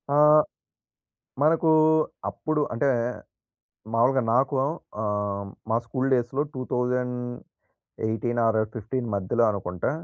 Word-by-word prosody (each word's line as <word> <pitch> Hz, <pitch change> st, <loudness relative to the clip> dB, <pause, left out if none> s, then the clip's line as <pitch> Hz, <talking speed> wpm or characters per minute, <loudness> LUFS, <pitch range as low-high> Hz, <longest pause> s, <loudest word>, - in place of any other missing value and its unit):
ఆహ్, 150 Hz, +1 st, +7 dB, 1.0 s
మనకు 160 Hz, +2 st, +3 dB, 0.6 s
అప్పుడు 155 Hz, -1 st, -2 dB
అంటే 130 Hz, +4 st, +1 dB, 1.0 s
మామూలుగా 125 Hz, +3 st, +3 dB
నాకు 135 Hz, +3 st, +2 dB, 0.5 s
ఆహ్, 105 Hz, -1 st, -2 dB, 0.2 s
మా 110 Hz, -, +3 dB
స్కూల్ 130 Hz, +3 st, -1 dB
డేస్‌లో 125 Hz, +3 st, 0 dB
2018 125 Hz, -2 st, -3 dB
ఆర్ 110 Hz, -1 st, +2 dB, 0.2 s
15 120 Hz, +3 st, -3 dB
మధ్యలో 100 Hz, +5 st, +1 dB
అనుకుంటా 90 Hz, -2 st, -3 dB
120 Hz, 90 wpm, -25 LUFS, 110-135 Hz, 1.0 s, ఆహ్